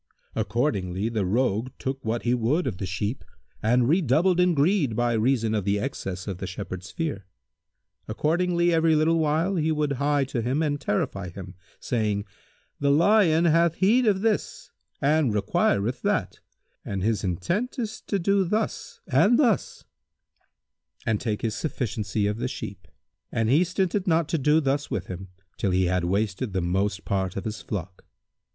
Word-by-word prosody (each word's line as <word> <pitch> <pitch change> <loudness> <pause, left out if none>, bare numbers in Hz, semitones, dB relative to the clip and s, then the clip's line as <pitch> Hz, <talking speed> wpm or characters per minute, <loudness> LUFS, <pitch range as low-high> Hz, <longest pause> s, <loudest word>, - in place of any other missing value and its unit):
Accordingly 100 -5 -1
the 110 -5 -1
Rogue 115 +2 +1
took 135 0 -4
what 115 +1 -2
he 120 - +2
would 125 +9 +1
of 100 -8 -3
the 95 - -3
sheep 105 +7 -3 0.4
and 120 +2 +3
redoubled 170 +3 +3
in 180 -1 +4
greed 145 - +2
by 120 +1 +1
reason 115 -1 +1
of 105 -2 0
the 100 +1 +1
excess 95 -6 -4
of 95 -3 -4
the 95 - -4
Shepherd's 95 -1 -6
fear. 140 - -4 0.8
Accordingly, 170 +8 +1
every 160 -1 +3
little 160 +2 +3
while, 160 +5 +1
he 160 0 +1
would 150 -2 0
hie 145 0 +2
to 130 -3 -3
him 130 +7 0
and 145 -1 -1
terrify 100 -6 -2
him, 90 +1 -9 0.3
saying, 105 -4 -1 0.5
"The 140 - +1
lion 170 +1 +4
hath 165 0 +3
need 230 +6 +4
of 195 -2 +2
this 220 -1 -1 0.3
and 145 -5 +2
requireth 105 +3 +1
that, - - -1 0.4
and 95 -2 -4
his 110 0 0
intent 135 - -2
is 225 -4 -4
to 200 - 0
do 195 +2 +2
thus 210 +5 -3
and 165 - +4
thus," 245 -8 +1 1.2
and 110 -2 0
take 110 -4 -2
his 110 -2 0
sufficiency 110 -8 -2
of 105 +1 -1
the 125 +2 -2
sheep; 100 -7 -7 0.4
and 115 -1 0
he 155 +6 +5
stinted 185 +2 -1
not 165 -2 +2
to 165 - 0
do 150 +3 +4
thus 145 0 -1
with - - -3
him, 95 +1 -7 0.3
till 100 - 0
he 95 0 +2
had 90 0 0
wasted 100 +4 -1
the 95 - 0
most 95 +3 -1
part 95 -2 -1
of 100 - -4
his 110 0 -4
flock. 90 -3 -6
125 Hz, 170 wpm, -25 LUFS, 100-165 Hz, 1.2 s, he